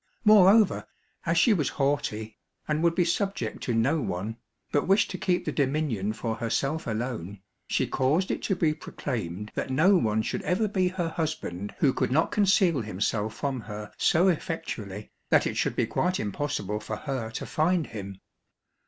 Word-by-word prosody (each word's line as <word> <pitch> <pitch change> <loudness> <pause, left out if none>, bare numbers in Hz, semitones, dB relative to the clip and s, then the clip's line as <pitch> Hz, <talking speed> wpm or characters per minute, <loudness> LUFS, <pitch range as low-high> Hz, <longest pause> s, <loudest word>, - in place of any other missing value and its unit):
Moreover, 210 0 +6 0.4
as 165 0 +2
she 220 +7 +5
was 155 -8 +1
haughty, 135 -7 -1 0.3
and 150 0 0
would 170 0 +3
be 175 - +3
subject 170 - -2
to 120 - -1
no 140 +8 +2
one, 105 +4 -3 0.3
but 145 - +1
wished 200 +2 +3
to - - -5
keep 180 -2 0
the - - -1
dominion 135 -8 0
for 110 0 -3
herself 135 +7 -1
alone, 110 -4 -3 0.3
she - - +1
caused 150 +9 +1
it - - -2
to 195 - 0
be 160 -4 +2
proclaimed 105 - -5
that - - -3
no 160 +10 +4
one 110 -7 +1
should - - -2
ever 205 +4 +1
be 190 -3 +1
her 180 -2 -2
husband 150 - -4
who 135 -3 +3
could - - -1
not 155 +5 +2
conceal 190 -7 +3
himself 105 +1 -2
from 140 -3 -2
her 105 -1 -7
so 175 +3 +3
effectually, 110 - -3 0.2
that - - +4
it - - -2
should - - 0
be - - +2
quite 180 +10 0
impossible 105 -2 -2
for 105 0 -5
her 130 -4 -4
to 115 - -5
find 165 +1 +1
him. 100 -3 -8
140 Hz, 175 wpm, -27 LUFS, 110-170 Hz, 0.4 s, Moreover